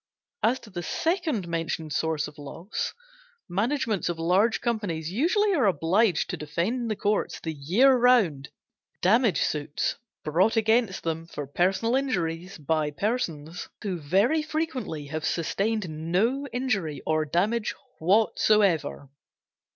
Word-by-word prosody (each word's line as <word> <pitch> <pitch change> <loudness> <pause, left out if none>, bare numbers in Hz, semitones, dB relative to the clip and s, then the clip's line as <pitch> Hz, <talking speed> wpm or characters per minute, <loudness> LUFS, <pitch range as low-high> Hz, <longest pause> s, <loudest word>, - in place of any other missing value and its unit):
As 245 +4 +2
to 215 - -14
the 175 -2 -4
second 320 - -1
mentioned 165 -2 -3
source 160 -2 0
of 150 0 -13
loss, 165 +7 -5 0.5
managements 215 0 0
of 170 - -2
large 185 +7 +2
companies 200 -9 -2
usually 370 - +2
are 275 - +3
obliged 180 +3 +2
to - - -3
defend 170 +8 -1
in 245 -2 -2
the 215 - -1
courts 205 +1 -1
the 160 - -4
year 190 - +4
round, 225 - +3 0.5
damage 220 0 +4
suits 145 -1 -1 0.3
brought 175 +9 +2
against 225 -2 +2
them 165 0 -3
for 150 -3 -6
personal 190 - +1
injuries 180 -9 -2
by 155 0 0
persons 165 - -3
who 190 -4 -2
very 200 - +2
frequently 270 - -3
have 155 +2 -5
sustained 200 +5 -1
no 185 - 0
injury 200 - -2
or 155 0 +1
damage 205 +9 0 0.2
whatever. 195 -5 +2
190 Hz, 130 wpm, -26 LUFS, 160-230 Hz, 0.5 s, year